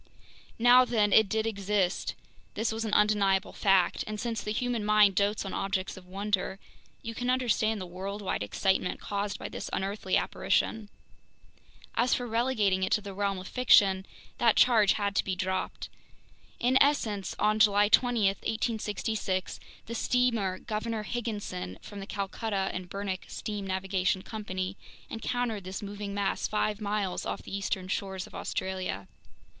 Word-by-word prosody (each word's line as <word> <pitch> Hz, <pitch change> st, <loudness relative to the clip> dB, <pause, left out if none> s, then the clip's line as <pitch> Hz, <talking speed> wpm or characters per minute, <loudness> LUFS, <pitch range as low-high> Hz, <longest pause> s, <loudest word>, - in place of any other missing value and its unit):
Now 245 Hz, +2 st, +7 dB
then, 215 Hz, -5 st, +2 dB
it 220 Hz, -3 st, +6 dB
did 220 Hz, +2 st, 0 dB
exist, 200 Hz, -3 st, 0 dB, 0.4 s
this 220 Hz, +2 st, 0 dB
was 225 Hz, +1 st, -3 dB
an 215 Hz, -, -3 dB
undeniable 205 Hz, -2 st, +3 dB
fact; 195 Hz, -3 st, +3 dB
and 215 Hz, 0 st, -4 dB
since 230 Hz, -2 st, -2 dB
the 210 Hz, -, -3 dB
human 240 Hz, 0 st, -1 dB
mind 210 Hz, -1 st, +5 dB
dotes 200 Hz, +2 st, +1 dB
on 195 Hz, -, -5 dB
objects 195 Hz, -1 st, -2 dB
of 185 Hz, -1 st, -13 dB
wonder, 195 Hz, 0 st, -1 dB, 0.5 s
you 230 Hz, -, -5 dB
can 245 Hz, +2 st, -3 dB
understand 230 Hz, -4 st, +1 dB
the 185 Hz, -, -5 dB
worldwide 190 Hz, -, -4 dB
excitement 180 Hz, -, 0 dB
caused 205 Hz, 0 st, -3 dB
by -, -, -6 dB
this -, -, -6 dB
unearthly 195 Hz, 0 st, 0 dB
apparition. 220 Hz, -2 st, 0 dB, 1.0 s
As 245 Hz, +1 st, +2 dB
for 245 Hz, -, -3 dB
relegating 225 Hz, -5 st, +1 dB
it 185 Hz, -, 0 dB
to 215 Hz, -, +2 dB
the 200 Hz, -1 st, -7 dB
realm 200 Hz, 0 st, -1 dB
of 185 Hz, 0 st, -7 dB
fiction, 195 Hz, -6 st, +4 dB, 0.3 s
that 230 Hz, -2 st, +4 dB
charge 220 Hz, -5 st, +5 dB
had 200 Hz, -1 st, -1 dB
to -, -, +3 dB
be 190 Hz, -, -2 dB
dropped. 185 Hz, +1 st, -2 dB, 0.7 s
In 255 Hz, +2 st, +3 dB
essence, 220 Hz, -9 st, +1 dB
on 215 Hz, +1 st, +2 dB
July 205 Hz, -1 st, +5 dB
20, 240 Hz, -1 st, +3 dB
1866, 210 Hz, -1 st, -1 dB, 0.3 s
the 230 Hz, -, -6 dB
steamer 230 Hz, -6 st, +1 dB
Governor 220 Hz, 0 st, -3 dB
Higginson, 205 Hz, -, -4 dB
from 205 Hz, -, -8 dB
the 195 Hz, -, -7 dB
Calcutta 200 Hz, 0 st, -2 dB
& 180 Hz, -, -17 dB
Burnach 195 Hz, -1 st, -4 dB
Steam 205 Hz, -2 st, -5 dB
Navigation 190 Hz, 0 st, 0 dB
Co., 220 Hz, -1 st, -6 dB, 0.7 s
encountered 225 Hz, -2 st, -2 dB
this 185 Hz, +2 st, -6 dB
moving 205 Hz, 0 st, -5 dB
mass 200 Hz, -1 st, 0 dB
five 210 Hz, 0 st, -1 dB
miles 205 Hz, -3 st, -1 dB
off -, -, -4 dB
the -, -, -6 dB
eastern 195 Hz, -1 st, -2 dB
shores 190 Hz, 0 st, -3 dB
of -, -, -16 dB
Australia. 185 Hz, -, -3 dB
205 Hz, 155 wpm, -29 LUFS, 190-220 Hz, 1.0 s, Now